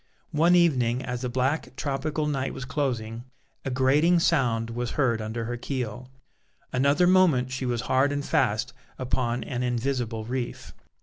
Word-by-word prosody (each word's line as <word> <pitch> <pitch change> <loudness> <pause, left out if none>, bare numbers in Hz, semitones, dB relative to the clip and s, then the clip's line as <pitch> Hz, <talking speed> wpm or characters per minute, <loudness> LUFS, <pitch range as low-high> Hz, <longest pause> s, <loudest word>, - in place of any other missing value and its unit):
One 170 +4 +4
evening 130 -8 +3
as 125 -1 -4
the 125 - -2
black 130 +1 -1
tropical 145 +3 -2
night 135 -3 -2
was 125 - -6
closing, 120 -4 -2 0.4
a - - -2
grating 140 +7 +3
sound 120 -9 +1
was 120 +1 -3
heard 120 -6 +2
under 110 +2 -4
her 120 +1 -3
keel: 125 -1 -4 0.6
another 140 +6 +3
moment 175 -9 +4
she 130 0 -3
was 120 -2 -1
hard 130 +3 +2
and 145 0 -2
fast 130 -4 +1 0.2
upon 125 -1 -1
an 125 -3 -4
invisible 120 -2 -1
reef. 125 +1 -4
130 Hz, 150 wpm, -26 LUFS, 120-145 Hz, 0.6 s, One